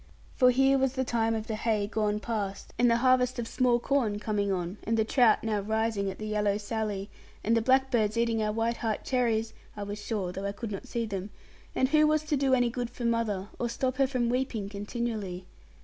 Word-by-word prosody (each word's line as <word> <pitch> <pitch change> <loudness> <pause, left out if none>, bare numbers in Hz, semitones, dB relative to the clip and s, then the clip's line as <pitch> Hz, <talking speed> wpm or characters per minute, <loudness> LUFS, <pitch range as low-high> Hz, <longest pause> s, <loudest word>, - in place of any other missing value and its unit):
For 250 - +5
here 270 +2 +4
was 265 -1 +1
the 260 -1 0
time 225 -2 0
of 220 -1 -3
the 225 - -4
hay 215 -1 0
gone 210 0 0
past, 210 -3 -4
and 245 0 +5
the 230 - +4
harvest 255 0 +3
of 235 -1 -3
small 250 -1 +2
corn 240 -4 0
coming 205 -1 -1
on, 180 +1 -2
and 225 +1 0
the 220 - +2
trout 240 -1 +4
now 215 -2 0
rising 220 -1 0
at 190 - -6
the 215 - -6
yellow 210 -1 +1
Sally, 210 -2 -3 0.3
and 225 +2 +2
the 230 - +3
blackbirds 245 -3 +2
eating 230 -1 +1
our 215 0 0
white 230 +2 -1
heart 220 -2 -2
cherries 225 -3 0 0.2
(I 205 - -3
was 205 +1 -6
sure, 200 -6 -2
though 195 +2 -5
I 200 - -2
could 215 +1 -6
not 195 - -6
see 235 -1 -2
them), 200 -2 -4 0.5
and 260 - +2
who 305 +1 +5
was 310 0 +2
to 305 -1 0
do 270 -1 +3
any 245 -2 +2
good 245 -1 -3
for 240 0 -6
mother, 215 -4 0
or 240 - -1
stop 255 +2 -1
her 270 -1 +3
from 250 -3 0
weeping 240 -5 -1
continually? 205 -3 -4
225 Hz, 225 wpm, -29 LUFS, 210-245 Hz, 0.5 s, For